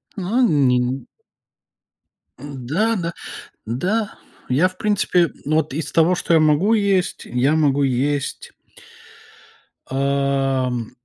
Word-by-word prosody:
Ну, 200 +5 -1
э, 255 - +4
ни 135 -6 +3
н 130 +2 -3 1.3
н-да, 145 - -2
да. 170 -3 -3 0.5
Да. 190 - -1 0.3
Я, 150 +9 +3
в 185 - -15
принципе, 185 -5 +1
вот 155 -2 0
из 160 - -4
того, 165 +2 +4
что 170 - 0
я 160 - +5
могу 155 +8 +3
есть, 200 -4 0
я 125 +5 +1
могу 145 -3 +2
есть 135 +2 -1 1.4
ам, 135 -3 -1
145 Hz, 115 wpm, -20 LUFS, 135-180 Hz, 1.4 s, я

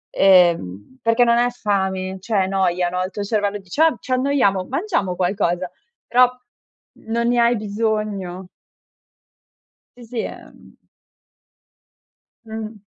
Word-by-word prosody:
ehm, 165 - +3
perché 230 +2 +3
non 235 0 +3
è 245 0 +3
fame, 190 -5 -2
cioè 200 0 0
è - - -2
noia, 180 -2 +1
no, 180 +1 -2
il 185 - -3
tuo 205 - -4
cervello 205 -1 -1
dice: 195 - -4
"Ah, 320 -4 +5
ci - - -9
annoiamo, 255 -8 +2
mangiamo 275 - -1
qualcosa?" 180 -1 -1 0.4
Però, 250 +1 +5 0.8
non 235 +1 0
ne 245 0 +2
hai 235 +1 +4
bisogno. 205 -3 -3 1.5
Sì, 245 - -12
sì, 230 +1 -5
ehm - - -11 1.7
Mh. 220 -1 -7
205 Hz, 125 wpm, -21 LUFS, 185-235 Hz, 1.7 s, Ah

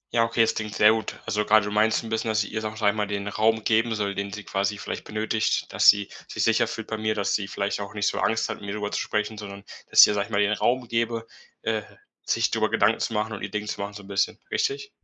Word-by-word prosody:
Ja, 115 - +5
okay, 115 0 +1
das 115 0 +3
klingt 110 -1 -5
sehr 105 +1 +6
gut. 110 -2 -3
Also, 105 +1 0
grade 110 0 +4
du 105 - -4
meinst 110 +2 +2
'n 115 - -7
bisschen, 110 0 -1
dass 110 -1 +2
ich - - -9
ihr, 110 0 -3
sage 110 0 -4
ich, 110 - -8
einmal 105 0 +2
den 100 0 -3
Raum 110 +1 +1
geben 110 +1 +2
soll, 100 -2 -1
den 100 0 -4
sie 105 +2 -7
quasi 100 +1 -1
vielleicht - - -6
benötigt, 110 0 -1
dass - - +6
sie 100 -1 +5 0.2
sich - - -2
sicher - - +3
fühlt - - -5
bei 110 - -4
mir, 110 0 0
dass 100 -1 0
sie 100 -2 -1
vielleicht 100 0 -2
auch 100 +1 -7
nicht 105 0 0
so - - -1
Angst 115 - +1
hat, - - -4
mit - - -11
mir 100 - -3
drüber 105 -1 -3
zu - - -1
sprechen, 105 0 -2
sondern 100 -1 -8 0.3
dass - - +8
ich - - +10
ihr, - - +1
sage 100 -1 -1
ich - - -16
mal, 100 - +1
den 105 0 +3
Raum 125 +3 0
gebe, 115 0 -1 0.4
äh, 110 -1 0 0.4
sich - - +1
drüber - - +1
Gedanken - - +2
zu - - -1
machen 110 +1 -1
und 100 - -6
ihr 100 - -4
Ding 105 +1 -3
zu 105 - -4
machen 100 +1 -4
so 105 - -9
'n 95 - -14
bisschen. 100 0 0
Richtig? 430 -1 -1
105 Hz, 285 wpm, -25 LUFS, 100-110 Hz, 0.4 s, ich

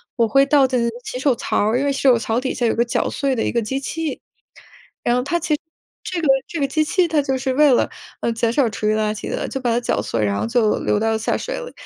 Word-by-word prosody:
我 235 - +3
会 275 +5 +4
倒 280 -1 +4
在 255 -1 0
那 235 - +1
个 230 - -9
洗 250 - -5
手 265 -1 +2
槽 - - -2
儿， 235 - +1
因 280 - 0
为 285 - +2
洗 275 - -3
手 255 -3 +6
槽 225 0 -1
底 260 +1 -2
下 245 - 0
有 225 - +2
个 235 - +2
绞 235 - -1
碎 275 -2 -1
的 225 - -1
一 - - -1
个 235 - 0
机 265 +5 -2
器， 320 -1 -4 0.8
然 240 - +2
后 250 - +1
它 315 +6 0
其 325 -2 -1
实 - - -9 0.4
这 355 -2 -3
个 310 - 0 0.2
这 335 - -4
个 275 - +1
机 310 +3 +1
器 355 +3 +1
它 310 -3 +2
就 265 -1 -1
是 260 0 -1
为 295 0 +5
了， - - +2 0.3
呃， 235 - 0
减 230 0 0
少 265 -4 +2
厨 210 0 -3
余 215 - +3
垃 215 -1 0
圾 - - -6
的， - - -3
就 270 - -4
把 240 -2 0
它 235 - +2
搅 - - 0
碎， 115 -2 -2
然 100 -1 -1
后 - - -1
就 230 -3 +2
流 205 - 0
到 225 0 +1
了 220 - +1
下 220 - 0
水 - - -4
里。 485 - -8
255 Hz, 325 characters per minute, -20 LUFS, 230-285 Hz, 0.8 s, 手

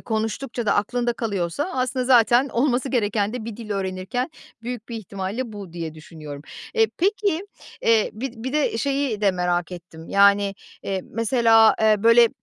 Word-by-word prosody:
konuştukça 225 +2 -3
da 200 - +3
aklında 240 +3 0
kalıyorsa 210 - -2
aslında 255 0 -1
zaten 245 +1 +5
olması 255 +1 0
gereken 215 -4 0
de 245 -3 -5
bir 225 -2 -6
dil 225 -3 -9
öğrenirken 195 - -2 0.3
büyük 240 -1 -6
bir 235 - -5
ihtimalle 210 +3 -5
bu 200 -5 -9
diye 165 -2 -5
düşünüyorum. 150 -2 -10 0.3
Eee, 450 -1 +4
peki, 395 -1 0 0.4
eee, 225 -2 +3
bir 245 +4 -5
bir 250 +4 -5
de 295 -6 +1
şeyi 275 -4 -1
de 205 -2 +4
merak 180 -1 -1
ettim, 170 -2 -11
yani, 200 0 +4 0.3
eee, 190 -1 -2
mesela, 230 -1 +4
eee, 215 -1 +5
böyle 230 +1 +7
225 Hz, 160 wpm, -23 LUFS, 195-250 Hz, 0.4 s, böyle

